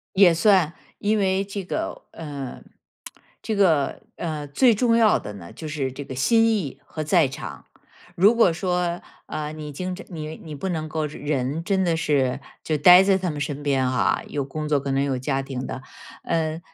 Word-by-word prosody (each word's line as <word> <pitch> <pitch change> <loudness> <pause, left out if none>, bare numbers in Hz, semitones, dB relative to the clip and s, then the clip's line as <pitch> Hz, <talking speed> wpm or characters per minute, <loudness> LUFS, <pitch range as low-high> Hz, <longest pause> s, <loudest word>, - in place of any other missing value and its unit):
也 190 -3 +7
算， 180 -3 +3 0.2
因 215 +1 +1
为 190 -1 +1
这 200 0 -6
个 - - -4
呃， 145 -5 -7 0.8
这 220 - -2
个 165 -9 +2
呃， 155 -3 -4
最 225 - +4
重 230 +1 +2
要 225 -2 +5
的 105 - -8
呢， 85 -4 -10
就 160 - -8
是 140 -3 -2
这 140 +2 -7
个 130 - -7
心 225 - +3
意 200 -12 -1
和 155 - -5
在 160 -2 +4
场。 70 - -8 0.5
如 200 +6 +6
果 225 -7 +4
说， 180 0 -1 0.3
呃， 150 0 -4
你 155 -1 -7
经常 180 +5 -5
你 155 -3 -6
你 155 - -9
不 145 +7 -4
能 160 -3 -3
够 155 0 -2
人 145 0 -2
真 190 +1 +1
的 170 -2 +1
是 140 -5 +1 0.2
就 155 - 0
待 180 +5 +8
在 195 -1 +4
他 185 -2 -2
们 150 -1 -5
身 145 -1 -3
边 135 -3 +1
啊， 130 -1 +1
有 145 -2 -3
工 150 +3 -5
作， 145 -2 +2
可 140 0 -4
能 135 +1 +1
有 135 -2 -1
家 135 +1 -1
庭 135 -1 -5
的。 130 - -6 0.4
呃， 160 -1 -1
155 Hz, 210 characters per minute, -24 LUFS, 140-185 Hz, 0.8 s, 待